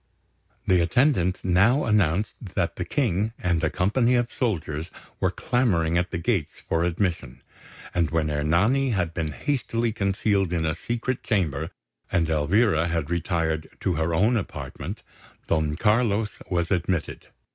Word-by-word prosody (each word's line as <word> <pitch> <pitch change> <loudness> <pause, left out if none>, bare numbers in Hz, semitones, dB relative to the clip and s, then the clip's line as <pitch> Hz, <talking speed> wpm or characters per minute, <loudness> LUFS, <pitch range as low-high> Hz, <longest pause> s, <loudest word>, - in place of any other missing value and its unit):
The 90 -2 +4
attendants 95 - +2
now 100 +10 +4
announced 100 -3 +2 0.2
that - - 0
the - - -3
King 105 +6 0
and 85 -2 0
a 80 - +3
company 115 +9 +2
of 120 -1 0
soldiers 80 - -2 0.3
were - - +2
clamouring 90 -10 +1
at 90 +1 +1
the 90 - -3
gates 85 -2 -1
for 80 0 +1
admission; 85 -6 -2 0.5
and 85 -3 +1
when 80 -2 0
Ernani 100 - +2
had 85 -5 -1
been 80 -2 -2
hastily 120 - -1
concealed 100 -2 0
in 80 -2 0
a 80 - +1
secret 120 - -3
chamber, 85 - -1 0.4
and 80 -2 +2
Elvira 80 +3 +2
had 80 -2 -2
retired 80 -2 -1
to 95 - +1
her 80 +1 0
own 110 +8 +3
apartment, 100 - -6 0.4
Don 80 -2 0
Carlos 105 +2 +2 0.2
was 85 -1 0
admitted. 85 -2 -1
90 Hz, 145 wpm, -25 LUFS, 80-110 Hz, 0.5 s, The